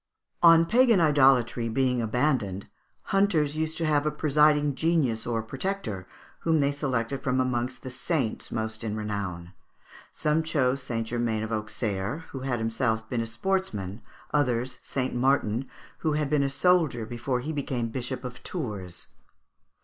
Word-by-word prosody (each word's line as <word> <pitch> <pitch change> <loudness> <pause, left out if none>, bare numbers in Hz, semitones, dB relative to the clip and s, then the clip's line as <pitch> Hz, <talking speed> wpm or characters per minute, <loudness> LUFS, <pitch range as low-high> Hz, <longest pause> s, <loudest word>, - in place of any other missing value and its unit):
On 165 -1 +7
pagan 235 +1 +4
idolatry 130 -6 +4
being 125 +1 +1
abandoned, 115 -5 0 0.5
hunters 170 -7 +2
used 160 0 -1
to 165 - -1
have 150 -2 +2
a 150 - +1
presiding 150 -1 +3
genius 140 -8 +1
or 115 -2 -1
protector, 130 - -4 0.3
whom 160 -1 +2
they 140 0 +2
selected 135 -2 -2
from 130 0 0
amongst 125 0 -1
the 130 - -6
saints 130 -3 -2
most 110 0 -3
in 110 -2 -2
renown. 95 -5 -4 0.6
Some 155 +1 +1
chose 140 -5 +1
St. 115 -3 -2
Germain 110 -2 -1
d'Auxerre, 110 +3 -2
who 135 - -5
had 130 -2 -1
himself 115 0 -1
been 120 -2 0
a 115 - -3
sportsman; 115 - -2 0.3
others 125 -3 0
St. 130 -1 -2
Martin, 125 -1 +1 0.3
who 155 -2 0
had 150 -1 -1
been 150 -2 +3
a 140 - +1
soldier 155 -6 +2
before 120 +2 -2
he 155 +5 -4
became 130 -5 -2
Bishop 125 +2 -4
of 125 -1 -7
Tours. 105 - -5
130 Hz, 150 wpm, -27 LUFS, 115-150 Hz, 0.6 s, On